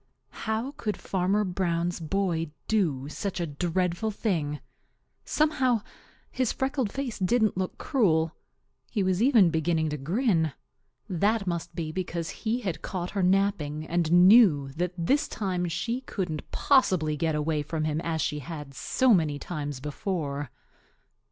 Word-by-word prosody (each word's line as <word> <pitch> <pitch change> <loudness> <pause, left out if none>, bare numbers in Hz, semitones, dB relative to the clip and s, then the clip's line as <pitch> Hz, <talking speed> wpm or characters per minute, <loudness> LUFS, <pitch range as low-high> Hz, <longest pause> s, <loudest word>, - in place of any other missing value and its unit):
How 225 +5 -1
could 210 -2 -2
Fanner 195 +3 0
Brown's 175 -2 -1
boy 165 -1 -1 0.2
do 155 -11 +1
such 190 +5 -4
a 170 - 0
dreadful 175 +6 -1
thing? 165 -9 -1 0.7
Somehow, 260 -7 +2 0.5
his 255 -3 0
freckled 265 -5 -1
face 270 -6 -4
didn't 215 +3 +2
look 185 0 -3
cruel. 165 - +2 0.6
He 205 - 0
was 185 +1 +1
even 230 -9 +5
beginning 160 -1 +1
to 150 - -3
grin. 165 - +1 0.5
That 200 +4 +1
must 170 -1 -3
be 160 -2 -3
because 170 -1 -3
he 230 +2 -2
had 185 -8 -3
caught 180 -2 -4
her 200 - -1
napping 180 -5 +1
and 170 -1 0 0.2
knew 185 - +6
that 175 +6 -2
this 280 - +2
time 180 -4 -2
she 230 +10 -2
couldn't 180 - -4
possibly 185 - +3
get 160 +1 0
away 150 0 0
from 155 +1 -3
him 155 +1 -1
as 160 -2 -1
she 150 - -1
had 145 -1 -7
so 255 - +2
many 155 -6 +2
times 145 -4 -5
before. 145 -2 -3
175 Hz, 145 wpm, -27 LUFS, 155-210 Hz, 0.7 s, knew